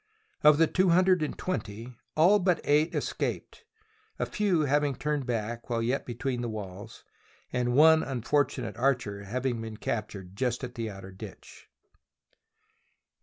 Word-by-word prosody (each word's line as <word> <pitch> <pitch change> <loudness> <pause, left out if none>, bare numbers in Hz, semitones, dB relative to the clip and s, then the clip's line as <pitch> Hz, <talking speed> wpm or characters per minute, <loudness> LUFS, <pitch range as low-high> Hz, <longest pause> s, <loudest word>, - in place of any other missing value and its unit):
Of 150 -1 +7
the 165 - +5
two 185 +3 +2
hundred 185 0 +4
and 155 - -2
twenty, 120 - -4 0.2
all 185 +7 +6
but 180 -3 +2
eight 150 +3 +2
escaped, - - -3 0.5
a - - -1
few 195 -6 +1
having 145 -1 +1
turned 150 -1 -2
back 115 0 -3
while 115 -1 0
yet 125 +4 -1
be 120 - -5
tween 125 0 -2
the 120 - -3
walls, 105 0 -8 0.5
and 125 0 0
one 160 +2 +7
unfortunate 130 -3 -1
archer 120 -6 0
having 120 +2 -2
been 110 -1 -7
captured 100 -5 -4
just 125 +2 -1
at 125 -1 -5
the 115 -2 -4
outer 95 -1 -9
ditch. 95 - -12
125 Hz, 150 wpm, -28 LUFS, 115-150 Hz, 0.5 s, Of